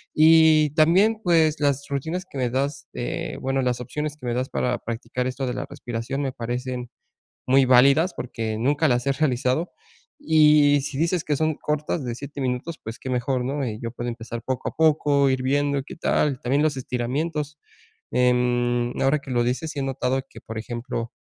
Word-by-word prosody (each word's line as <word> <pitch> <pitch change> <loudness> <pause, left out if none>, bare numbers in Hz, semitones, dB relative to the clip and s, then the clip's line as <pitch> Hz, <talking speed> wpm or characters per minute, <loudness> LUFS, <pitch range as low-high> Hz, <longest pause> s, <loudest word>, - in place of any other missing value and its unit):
Y 155 -1 +6
también, 190 +8 +4
pues 160 -3 +3
las 140 -1 +1
rutinas 160 +6 -3
que 140 - -8
me 125 -2 0
das, 140 +2 -2
eh, 120 - -4
bueno, 135 0 0
las 125 -1 -1
opciones 150 +4 -4
que 135 - -11
me 120 - 0
das 130 +1 -1
para 125 0 -1
practicar 120 +2 -4
esto 130 0 -3
de 125 - -2
la - - -3
respiración 120 +4 -4
me 135 -2 -1
parecen 125 0 -4 0.6
muy 135 +1 +5
válidas 140 +8 +5
porque 110 -3 -4
nunca 145 +6 +2
las 125 0 +1
he 140 - +3
realizado. 135 +2 0 0.5
Y 150 - +5
si 140 -1 -5
dices 165 +1 0
que 145 -2 0
son 155 +1 +1
cortas 150 0 -2
de 120 -2 -3
7 140 +2 -8
minutos, 130 +6 -3
pues 110 +2 -7
qué 130 - -7
mejor, 125 0 -1
¿no?, 140 +2 -2
y 110 -2 -4
yo 115 -1 -5
puedo 120 0 -5
empezar 115 0 -7
poco 130 -1 -3
a - - -19
poco, 145 -3 +3
ir 130 -1 0
viendo 140 +2 +1
y 135 - -4
qué - - -10
tal. 145 -4 0
También 140 +4 +1
los 155 -3 +1
estiramientos. 145 +5 -3 0.5
Em, 120 -1 +1
ahora 140 +2 +2
que 135 - -11
lo 120 -1 +1
dices, 130 +6 -2
sí 145 - -7
he - - -1
notado 135 0 -1
que, - - -13
por 115 0 -7
ejemplo, 120 +1 -5
135 Hz, 195 wpm, -24 LUFS, 125-150 Hz, 0.6 s, Y